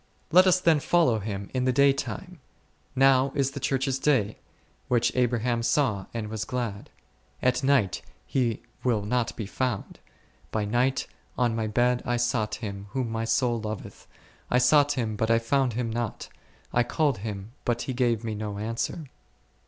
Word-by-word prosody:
Let 185 Hz, +3 st, +7 dB
us 185 Hz, 0 st, +5 dB
then 165 Hz, -4 st, +4 dB
follow 150 Hz, -8 st, +3 dB
Him 100 Hz, -1 st, -5 dB
in 130 Hz, -1 st, 0 dB
the 130 Hz, -, +3 dB
day 140 Hz, +2 st, +5 dB
time, 180 Hz, +5 st, -6 dB, 0.6 s
now 135 Hz, 0 st, +4 dB
is 135 Hz, -1 st, +1 dB
the 140 Hz, -, -6 dB
Church's 135 Hz, 0 st, 0 dB
day, 125 Hz, -8 st, +1 dB, 0.5 s
which 120 Hz, -1 st, +2 dB
Abraham 120 Hz, -1 st, +1 dB
saw 115 Hz, -, +1 dB
and 115 Hz, -2 st, -4 dB
was 110 Hz, 0 st, -3 dB
glad; 120 Hz, -6 st, -4 dB, 0.5 s
at 125 Hz, +2 st, +1 dB
night 130 Hz, -9 st, +2 dB, 0.2 s
He 120 Hz, -5 st, -1 dB, 0.2 s
will 115 Hz, -5 st, +1 dB
not 115 Hz, +2 st, -1 dB
be 110 Hz, -, -4 dB
found, 120 Hz, +1 st, -3 dB, 0.5 s
by 110 Hz, -1 st, -1 dB
night 120 Hz, +5 st, +1 dB, 0.3 s
on 120 Hz, -3 st, +2 dB
my 110 Hz, -1 st, -1 dB
bed 120 Hz, +3 st, +2 dB
I 120 Hz, 0 st, 0 dB
sought 120 Hz, -3 st, 0 dB
Him 100 Hz, -3 st, -6 dB
whom 125 Hz, -4 st, -1 dB
my 115 Hz, 0 st, -2 dB
soul 120 Hz, -1 st, +1 dB
loveth, 110 Hz, -1 st, -7 dB, 0.4 s
I 125 Hz, -, +3 dB
sought 145 Hz, +3 st, +5 dB
Him 115 Hz, -5 st, -2 dB
but 110 Hz, +2 st, -1 dB
I 115 Hz, -, +5 dB
found 125 Hz, +2 st, +1 dB
Him 115 Hz, 0 st, -2 dB
not; 115 Hz, -1 st, -4 dB, 0.4 s
I 120 Hz, -, +4 dB
called 140 Hz, 0 st, +1 dB
Him 100 Hz, 0 st, -6 dB
but 120 Hz, 0 st, 0 dB
He 130 Hz, -, -3 dB
gave 120 Hz, -3 st, +1 dB
me 110 Hz, -1 st, -3 dB
no 105 Hz, -1 st, -4 dB
answer. 115 Hz, +8 st, -3 dB
120 Hz, 170 wpm, -27 LUFS, 110-135 Hz, 0.6 s, Let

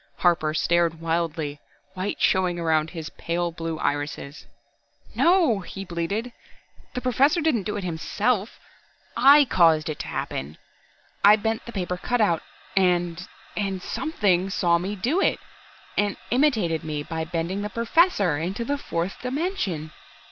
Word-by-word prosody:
Harper 170 Hz, -3 st, +2 dB
stared 170 Hz, +1 st, +1 dB
wildly, 165 Hz, -3 st, -2 dB, 0.3 s
white 190 Hz, +2 st, -3 dB
showing 185 Hz, -2 st, +2 dB
around 160 Hz, -2 st, +1 dB
his 160 Hz, -3 st, -7 dB
pale 170 Hz, +1 st, -2 dB
blue 165 Hz, -1 st, -4 dB
irises. 145 Hz, -1 st, -3 dB, 0.7 s
"No!" 335 Hz, -, +4 dB
he 195 Hz, +1 st, -7 dB
bleated. 185 Hz, +8 st, -3 dB, 0.6 s
"The 250 Hz, -, -2 dB
Professor 265 Hz, +7 st, +3 dB
didn't 275 Hz, -, +1 dB
do 210 Hz, -, -2 dB
it 200 Hz, -, -4 dB
himself 190 Hz, +6 st, -1 dB, 0.6 s
I 280 Hz, +4 st, +7 dB
caused 165 Hz, -8 st, +3 dB
it 155 Hz, -, -4 dB
to -, -, -5 dB
happen. 70 Hz, +3 st, -4 dB, 0.7 s
I 205 Hz, +1 st, +9 dB
bent 220 Hz, +2 st, -2 dB
the -, -, -6 dB
paper 180 Hz, -4 st, -3 dB
cutout, 210 Hz, -6 st, +1 dB, 0.3 s
and 180 Hz, -2 st, +1 dB, 0.3 s
and 195 Hz, -2 st, -2 dB
Something 195 Hz, -, 0 dB
saw 170 Hz, -3 st, +2 dB
me 195 Hz, +4 st, -3 dB
do 265 Hz, -, 0 dB
it, -, -, +2 dB, 0.6 s
and 205 Hz, -1 st, 0 dB
imitated 225 Hz, -, +2 dB
me 150 Hz, -2 st, -3 dB
by 160 Hz, +1 st, -4 dB
bending 170 Hz, +4 st, -3 dB
the 210 Hz, -, -3 dB
Professor 230 Hz, -, +2 dB
into 190 Hz, +8 st, -3 dB
the 285 Hz, +3 st, -1 dB
fourth 170 Hz, -5 st, -3 dB
dimension!" 250 Hz, -, -2 dB
185 Hz, 140 wpm, -25 LUFS, 165-225 Hz, 0.7 s, I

